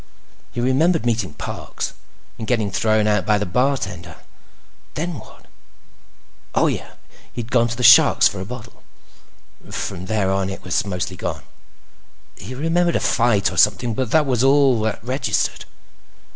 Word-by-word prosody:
He - - -6
remembered 140 +6 +2
meeting 115 -5 -1
Parks. - - -6 0.5
And 110 - -5
getting 110 -5 0
thrown 110 +2 +1
out 105 -2 +2
by 105 +3 +2
the 105 - -2
bartender. 100 -4 -2 0.8
Then 165 -2 -3
what? - - -16 1.1
Oh, - - +3
yeah. - - -3 0.4
He'd 120 -1 -6
gone 120 -2 +3
to 115 - -4
the 125 - -3
Shark's - - +7
for 100 - -5
a - - -4
bottle. 125 +1 -10 0.9
From 90 +2 -5
there 105 -3 0
on, 95 0 0
it 95 - -7
was 90 - 0
mostly 90 -1 -4
gone. - - -5 0.9
He 130 - -9
remembered 170 +4 +1
a - - +2
fight 115 -4 +2
or - - -8
something, 115 +3 +3
but 125 +1 -2
that 155 +4 +3
was 125 -3 0
all 135 -3 +4
that 110 -1 -2
registered. 130 +4 -1
115 Hz, 155 wpm, -21 LUFS, 105-130 Hz, 1.1 s, Shark's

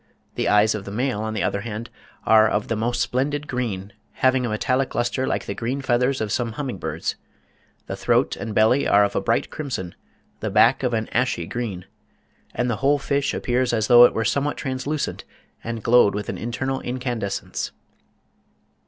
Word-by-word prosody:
The - - -1
eyes 105 +1 +4
of 105 -2 -4
the 100 - -8
male, 120 0 -1
on 110 0 -3
the 110 - -1
other 100 - -1
hand, 115 +2 -6 0.3
are 110 0 +6
"of 105 - -1
the 115 - 0
most 120 +3 -1
splendid 140 +4 -1
green, 105 -6 -3 0.2
having 130 -1 +2
a - - -3
metallic 130 +5 0
lustre 120 +2 0
like - - -1
the - - -3
green 125 +4 -3
feathers 130 0 +1
of 105 -2 -2
some 115 +1 -1
humming 125 -6 -4
birds. 80 0 -3 0.7
The - - -5
throat - - +1
and 110 -2 -6
belly 110 +6 +4
are 100 0 +5
of 100 - -1
a - - +1
bright - - 0
crimson, 125 - -4 0.5
the - - -2
back - - +4
of 125 -3 0
an 110 -1 -2
ashy 130 +2 0
green, 105 -7 -4 0.7
and 125 - 0
the 115 -3 -1
whole 140 +2 +3
fish 140 0 0
appears 125 0 0
as 110 -2 +1
though 120 +1 +8
it - - +2
were 115 - 0
somewhat 140 +5 0
translucent 135 +3 -3 0.4
and 115 -2 -5
glowed 115 -4 +5
with 105 0 -4
an - - -3
internal 130 +3 -2
incandescence." 120 -5 -3
120 Hz, 190 wpm, -23 LUFS, 110-130 Hz, 0.7 s, though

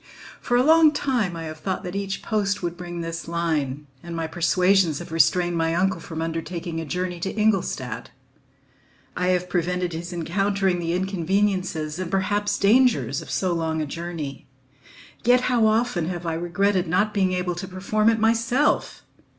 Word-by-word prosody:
For 245 - +1
a 250 - +4
long 315 +1 +6
time 245 -11 0
I 165 - -5
have 155 -1 -7
thought 190 +3 -3
that 180 +1 -5
each 195 -1 -3
post 205 -3 -1
would 170 0 -2
bring 175 -1 -6
this 165 0 -5
line, 155 -5 -1 0.2
and 170 -1 -7
my 165 -1 -2
persuasions 180 0 +2
have 175 +1 -8
restrained 175 +2 +3
my 165 0 +1
uncle 190 +1 +1
from 160 -1 -5
undertaking 165 0 -4
a - - -5
journey 180 +3 -3
to 195 +5 -3
Ingolstadt. 210 -3 0 1.1
I 180 - 0
have 180 0 +1
prevented 180 0 -1
his 170 +2 -5
encountering 190 +2 0
the 170 0 -1
inconveniences 185 -3 -1
and 185 -2 -3
perhaps 205 +2 0
dangers 215 - +3
of - - -11
so 185 -2 0
long 160 -1 -1
a 155 - -1
journey, 160 -2 -6 0.8
yet 245 +1 +5
how 245 -3 +3
often 215 -6 +1
have 175 -1 -4
I 165 - -1
regretted 180 +3 0
not 195 +6 +1
being 190 -2 +1
able 180 -1 -1
to 175 +2 -6
perform 200 +4 +1
it 225 - +2
myself! 230 +5 +1
180 Hz, 170 wpm, -24 LUFS, 165-200 Hz, 1.1 s, long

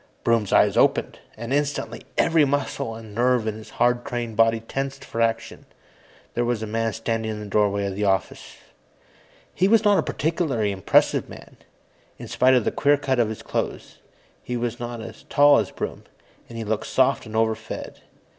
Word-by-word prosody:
Broom's 115 -4 +1
eyes - - +4
opened, - - +2 0.2
and 115 +3 -4
instantly 140 -6 -2
every 165 -2 +4
muscle 140 -5 -1
and 110 -2 -11
nerve 120 0 +2
in 110 - -1
his 110 0 -11
hard 120 0 +2
trained 120 -4 -4
body 115 +1 +3
tensed 135 +4 -5
for 115 - -3
action. 115 0 -2 0.7
There 120 - 0
was 120 -2 -1
a - - -2
man 115 +1 -1
standing 115 0 -2
in 110 -1 -4
the 105 - -7
doorway 100 0 +1
of 100 - -3
the 105 +1 -1
office. 95 -1 -2 1.0
He 185 - +2
was 225 +2 +4
not 205 -1 +5
a - - +4
particularly 145 - -1
impressive 95 -2 +2
man, - - -12 0.6
in - - -9
spite 130 +1 +3
of 125 - +2
the - - +1
queer 145 0 +3
cut 135 -3 -1
of 115 -2 +2
his 110 - -7
clothes. - - -4 0.4
He 125 - -4
was 120 0 -3
not 120 -1 -5
as 110 -1 -10
tall 145 0 +6
as - - -2
Broom, - - -6 0.4
and 115 - -8
he 115 - -3
looked 110 0 -2
soft 130 -2 +1
and 110 - -8
overfed. 110 0 -2
115 Hz, 185 wpm, -23 LUFS, 110-130 Hz, 1.0 s, tall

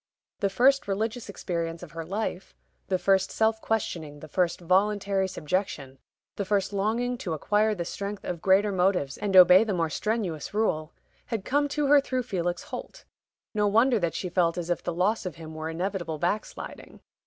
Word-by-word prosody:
The 200 - +1
first 265 +6 +3
religious 220 +3 -2
experience 170 -3 -4
of 175 - -10
her 165 0 -5
life 195 +1 -4 0.3
the 185 - +1
first 190 +1 +2
self 220 0 +1
questioning, 160 -9 -2
the 155 - -10
first 175 +2 0
voluntary 195 +2 +1
subjection, 150 -6 -3 0.4
the 200 - -1
first 200 0 0
longing 235 +5 0
to 175 - -3
acquire 210 +7 +1
the 175 -3 -4
strength 200 +3 -5
of 175 -2 -4
greater 195 +2 +4
motives 180 -7 +1
and 200 -2 -1
obey 180 +2 +9
the 210 -4 -1
more 165 -2 0
strenuous 205 -6 -2
rule 160 -8 0 0.4
had 220 -4 -3
come 290 +2 +2
to 290 +1 -1
her 285 0 +6
through 255 -2 -2
Felix 175 -6 -2
Holt. - - -8 0.5
No 210 -1 +2
wonder 230 +3 +4
that 170 -3 -1
she 185 - -3
felt 175 -1 +1
as 175 0 -3
if 175 - 0
the - - -3
loss 185 +6 +1
of 180 - -6
him 160 -1 -9
were 155 0 -5
inevitable 175 -1 -3
backsliding. 175 +7 -4
190 Hz, 180 wpm, -27 LUFS, 170-215 Hz, 0.5 s, obey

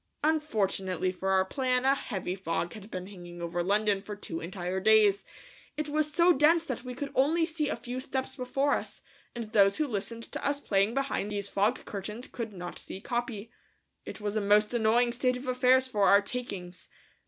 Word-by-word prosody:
Unfortunately 200 - 0
for 190 +1 -3
our 190 0 +3
plan 255 +3 0
a 270 - +5
heavy 190 -9 -3
fog 175 -2 -2
had 210 -1 -10
been 185 -3 -5
hanging 175 -3 -10
over 170 0 -2
London 200 +2 +2
for 210 +1 -7
two 165 -5 -5
entire 180 +1 -3
days. 210 0 +5 0.5
It 305 -1 -2
was 305 0 0
so 345 +4 +5
dense 325 +3 +4
that 255 -5 -4
we 250 -1 -6
could 280 +2 -5
only 320 +5 +3
see 315 -2 -2
a - - -1
few 250 +1 -6
steps 265 0 -3
before 270 +2 0
us, - - -4 0.3
and 230 -3 -5
those 200 -3 +5
who 310 - +1
listened 230 0 -4
to - - -5
us 285 0 +1
playing 200 -2 +1
behind 275 -7 -1
these 200 -1 -2
fog 200 +2 +1
curtains 210 +4 -6
could 230 -3 -5
not 180 -3 -7
see - - -8
Capi. 235 -1 -3 0.5
It - - -8
was 210 0 -3
a 215 - +1
most 210 +2 +3
annoying 235 +1 +3
state 250 +1 0
of 255 +1 -9
affairs 255 +1 +4
for 210 -6 +1
our 200 - +7
"takings." 195 -7 -6
220 Hz, 195 wpm, -29 LUFS, 195-260 Hz, 0.5 s, our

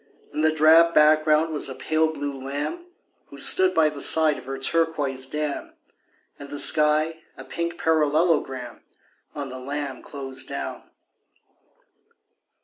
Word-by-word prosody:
In 150 - -2
the 155 0 +3
drab 160 +2 +5
background 155 +1 +4
was 150 - -3
a 130 - -6
pale 155 +4 0
blue 140 -3 -6
lamb 145 - -4 0.4
Who - - -13
stood 375 -1 +3
by 155 - +4
the 145 -2 -7
side 155 -2 +2
of - - -14
her 135 +1 -5
turquoise 140 -3 -1
dam, 150 0 -4 0.7
And 140 - -10
the 145 - -4
sky 155 +2 +2 0.2
a - - -9
pink 170 0 -4
parallelogram 150 -5 0 0.5
On 140 -2 -5
the 130 0 -8
lamb 140 +1 -5
closed 135 -2 -7
down. - - -6
150 Hz, 140 wpm, -24 LUFS, 140-160 Hz, 0.7 s, drab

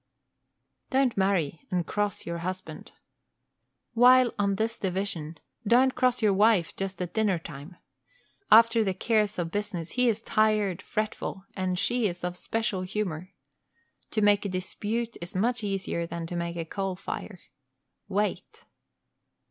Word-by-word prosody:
Don't 265 -2 +2
marry 185 -6 0
and 180 -2 0
cross 205 -1 -2
your 170 0 -4
husband. 185 +2 -6 1.0
While 250 +1 +6
on 200 -1 +2
this 225 +3 -2
division, 180 -5 -3 0.3
don't 255 +4 +5
cross 250 -2 +1
your 205 -2 +4
wife 200 -3 +3
just 195 0 -4
at 175 - -7
dinner 210 -5 +2
time. 165 +1 -10 0.8
After 230 +1 +7
the 190 -3 -1
cares 210 0 +1
of 170 -2 -2
business 200 -5 -3
he 250 0 +2
is 225 0 -1
tired, 215 -4 +2
fretful, 215 -2 -3
and 185 -1 -1
she 240 +3 +1
is 175 -2 -6
of 180 0 -2
similar 220 -1 -2
humor. 185 -3 -4 0.8
To 215 - -1
make 205 -1 +4
a 200 - -2
dispute 215 +5 -3
is 175 +1 -7
much 230 +4 +1
easier 190 -4 -2
than 170 0 -5
to 175 - -6
make 170 0 -3
a 165 -1 -3
coal 195 +2 -3
fire. 190 +1 -6 0.7
Wait! 205 +1 -2
200 Hz, 145 wpm, -27 LUFS, 180-220 Hz, 1.0 s, After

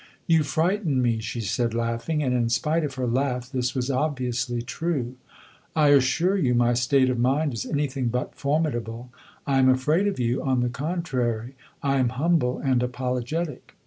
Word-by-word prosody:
"You 165 -1 +4
frighten 160 0 0
me," 120 -3 +1
she 115 +1 -4
said 115 +3 -1
laughing; 115 +6 -1
and 130 -2 0
in 120 -2 +1
spite 155 +6 +1
of 140 -3 -3
her 130 -1 -2
laugh 125 0 -1
this 125 -1 -1
was 130 +1 -1
obviously 125 -4 -1
true. 125 +1 -2 0.6
"I 150 -2 +4
assure 145 +7 +3
you 130 -10 +2
my 120 0 +3
state 130 +2 +3
of 125 - -2
mind 135 +4 +1
is 115 - -4
anything 140 -3 -1
but 125 +2 -2
formidable. 125 -5 -2 0.3
I 135 -1 +2
am 130 0 +5
afraid 150 +9 +2
of 200 - -2
you, 120 +1 0
on 130 -2 +1
the 120 - +1
contrary; 130 -5 -2 0.3
I 140 -1 +2
am 130 -2 +2
humble 150 -5 +2
and 130 -3 +1
apologetic." 125 +5 -3
130 Hz, 175 wpm, -25 LUFS, 120-150 Hz, 0.6 s, am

